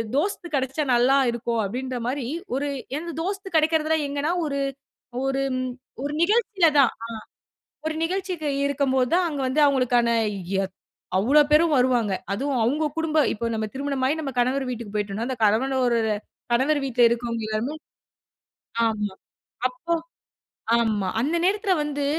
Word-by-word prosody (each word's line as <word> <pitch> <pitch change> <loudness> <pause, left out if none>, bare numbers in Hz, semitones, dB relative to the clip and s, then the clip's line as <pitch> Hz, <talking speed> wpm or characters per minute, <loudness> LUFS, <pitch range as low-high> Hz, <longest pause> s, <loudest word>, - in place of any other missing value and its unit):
தோஸ்த் 355 +4 -1
கிடைச்சா 270 +3 -1
நல்லா 250 +3 +4
இருக்கும் 235 -1 -1
அப்படின்றமாரி 250 +3 -3 0.3
ஒரு 285 +1 -1 0.3
எனது 335 +1 -5
தோஸ்த் 385 -1 -4
கிடைக்குறதலாம் 315 -1 +2
எங்கனா, 290 +4 -1
ஒரு 280 -1 -2 0.6
ஒரு- 270 -1 0 0.5
ஒரு 290 +1 -2
நிகழ்ச்சியில 405 -3 +3
தான் 265 -4 +5
அ. - - -3 0.8
ஒரு 315 - -1
நிகழ்ச்சிக்கு 360 -3 -2 0.2
இருக்கம்போது 265 -3 +1
தான் 365 -1 +2
அங்க 290 -2 -4
வந்து 280 +4 +1
அவங்களுக்கான 250 -4 +3 0.5
எ - - 0 0.5
அவ்வளவு 285 +9 +4
பேரும் 310 +2 +5
வருவாங்க. 245 -5 +2 0.2
அதுவும் 260 +3 -1
அவுங்க 295 +7 +1
குடும்ப 325 -1 0
இப்ப 230 +2 -2
நம்ம 220 -1 -1
திருமணம் 275 -1 -2
ஆயி 280 - +2
நம்ம 280 - -3
கணவர் 260 +3 +2
வீட்டுக்குப் 235 -4 -6
போயிட்டோனா, 210 +2 -2
அந்த 260 - -2
கணவன் 230 +6 +2
ஒரு 235 -1 +2 0.5
கணவர் 275 +5 +3
வீட்ல 250 -2 +1
இருக்குறவங்க 235 -1 -2
எல்லாருமே 220 +7 -2 1.1
ஆமா, 210 -3 -1 0.6
அப்போ 255 +7 -3 0.8
ஆமா. 215 -4 +1
அந்த 300 +7 0
நேரத்துல 400 0 +2
வந்து 290 -1 -3
270 Hz, 140 wpm, -24 LUFS, 240-310 Hz, 1.1 s, தான்